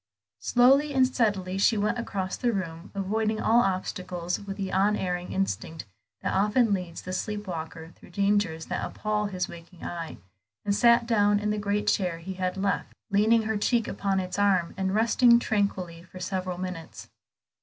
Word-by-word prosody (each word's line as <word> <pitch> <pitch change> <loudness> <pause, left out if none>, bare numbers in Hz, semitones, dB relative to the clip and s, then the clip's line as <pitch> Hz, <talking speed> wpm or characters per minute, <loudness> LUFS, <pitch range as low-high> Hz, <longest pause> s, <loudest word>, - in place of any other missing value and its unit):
Slowly 275 +4 +4
and 260 -1 +6
steadily 200 -7 0
she 220 +3 +4
went 210 +3 0
across 190 -5 -3
the 245 - 0
room, 170 -4 -4
avoiding 215 +2 0
all 230 +2 +4
obstacles 185 -3 -2
with 200 -1 -7
the 195 -2 -3
unerring 185 -2 0
instinct 180 -4 -2 0.4
that - - -1
often 210 +3 +3
leads 180 -3 -4
the 185 - -5
sleepwalker 180 -5 -4
through - - -18
dangers 200 -4 +1
that - - -3
appall 210 -1 -2
his 185 -3 -2
waking 170 +1 -12
eyes, 170 -2 -5 0.5
and 200 - +2
sat 235 +3 +5
down 205 -3 +3
in 210 0 -1
the 210 - -1
great 205 0 -1
chair 180 -4 +1
he 175 +3 -6
had 185 0 -2
left, 195 +1 -1 0.2
leaned 220 +3 +4
her 220 0 -1
cheek 230 +2 +1
upon 195 -1 -1
its 185 +1 -4
arm, 190 -4 +2
and 190 +1 -1
rested 235 +2 +5
tranquilly 190 -7 -1
for 185 +1 -12
several 185 -1 -3
minutes. 180 -3 -7
195 Hz, 165 wpm, -27 LUFS, 180-215 Hz, 0.5 s, and